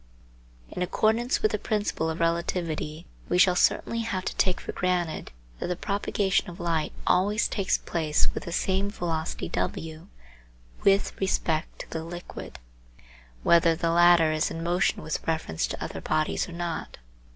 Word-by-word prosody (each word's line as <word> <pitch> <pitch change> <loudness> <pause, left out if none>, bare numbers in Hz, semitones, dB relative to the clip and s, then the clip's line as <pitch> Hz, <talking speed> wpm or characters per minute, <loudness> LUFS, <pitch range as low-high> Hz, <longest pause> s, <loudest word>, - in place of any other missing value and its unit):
In - - -5
accordance 220 +7 +1
with 215 - +4
the 210 - -1
principle 205 -7 -1
of 160 - -3
relativity 165 -1 -1 0.2
we 180 - +2
shall 180 0 +6
certainly 230 +5 +2
have 195 -5 -2
to - - -2
take 185 -2 +2
for - - -5
granted 180 -3 -1 0.3
that - - -2
the 180 - -1
propagation 200 0 0
of 175 - -10
light 165 -3 0
always 205 +4 +3
takes 195 -3 +1
place 155 -3 0
with - - -5
the 170 - -5
same 190 +3 0
velocity 165 -5 -3
w 160 +2 -3 0.8
with 195 0 +4
respect 165 -4 0
to - - -11
the 160 - -3
liquid, 175 +2 -8 0.9
whether 170 -1 +5
the 165 0 0
latter 170 -1 +6
is 155 0 +1
in 165 - -5
motion 175 +2 +1
with 155 - -4
reference 160 - -1
to - - -5
other 80 - -5
bodies 155 - 0
or - - -8
not. 170 -1 -4
175 Hz, 160 wpm, -27 LUFS, 160-190 Hz, 0.9 s, shall